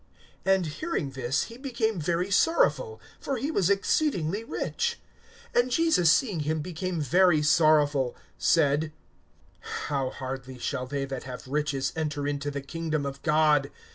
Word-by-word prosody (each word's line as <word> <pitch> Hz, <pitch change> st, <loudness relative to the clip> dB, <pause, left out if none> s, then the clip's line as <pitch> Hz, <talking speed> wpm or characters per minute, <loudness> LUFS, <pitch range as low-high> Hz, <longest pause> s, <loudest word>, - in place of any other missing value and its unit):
(23)And 190 Hz, -2 st, +3 dB
hearing 165 Hz, -, -3 dB
this, 130 Hz, +2 st, -1 dB
he 230 Hz, +1 st, -10 dB
became 235 Hz, -7 st, -1 dB
very 175 Hz, +5 st, -1 dB
sorrowful; 445 Hz, -, +2 dB, 0.2 s
for 275 Hz, -, -2 dB
he 275 Hz, +6 st, -2 dB
was 195 Hz, -, +2 dB
exceedingly 200 Hz, -, +1 dB
rich. 470 Hz, -, -2 dB, 0.5 s
(24)And 245 Hz, +1 st, +3 dB
Jesus 255 Hz, -, +4 dB
seeing 205 Hz, -, +2 dB
him 155 Hz, +1 st, -1 dB
became 180 Hz, +2 st, -3 dB
very 155 Hz, +2 st, +4 dB
sorrowful, 150 Hz, -4 st, +3 dB, 0.2 s
said: 155 Hz, 0 st, +2 dB, 0.7 s
How 140 Hz, -3 st, -3 dB
hardly 130 Hz, -1 st, -6 dB
shall 130 Hz, +1 st, -3 dB
they 140 Hz, +1 st, -2 dB
that 135 Hz, -1 st, -6 dB
have 130 Hz, 0 st, -8 dB
riches 140 Hz, -1 st, -1 dB
enter 150 Hz, -3 st, -2 dB
into 145 Hz, 0 st, -2 dB
the 140 Hz, -1 st, -4 dB
kingdom 155 Hz, 0 st, -3 dB
of 140 Hz, 0 st, -5 dB
God! 150 Hz, -2 st, +3 dB
155 Hz, 140 wpm, -27 LUFS, 140-195 Hz, 0.7 s, Jesus